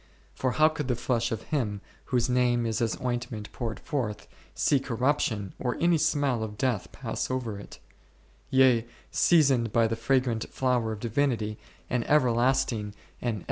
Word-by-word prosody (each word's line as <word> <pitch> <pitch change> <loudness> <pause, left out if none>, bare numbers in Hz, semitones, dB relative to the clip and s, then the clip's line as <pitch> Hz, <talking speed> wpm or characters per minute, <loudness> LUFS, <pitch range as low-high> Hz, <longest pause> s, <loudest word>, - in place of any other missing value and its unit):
For 130 -2 -1
how 155 0 +5
could 150 -3 -4
the 125 - +1
flesh 120 -1 -1
of 110 -1 -3
Him 110 -9 -2 0.3
whose 125 -2 +1
name 125 -1 +2
is 115 +1 -1
as 115 -1 0
ointment 120 -4 -3
poured 115 -3 -4
forth, 125 -9 -3 0.3
see 140 - +3
corrup 130 +3 0
tion 100 -5 -2
or 125 -2 -1
any 170 -1 +3
smell 140 -6 +1
of 105 -1 -5
death 125 -6 -1
pass - - -4
over 120 -6 -3
it; - - -11 0.7
yea, 130 -3 +4 0.2
seasoned 135 -9 +4
by 115 +1 +3
the 115 0 0
fragrant 125 -1 0
flower 125 -4 0
of 105 -1 -6
Divinity, 115 -3 0 0.3
an 125 -2 0
everlasting 120 -5 +2 0.3
and 120 -2 -1
,u - - -5
Exod. - - -6
120 Hz, 170 wpm, -28 LUFS, 115-130 Hz, 0.7 s, how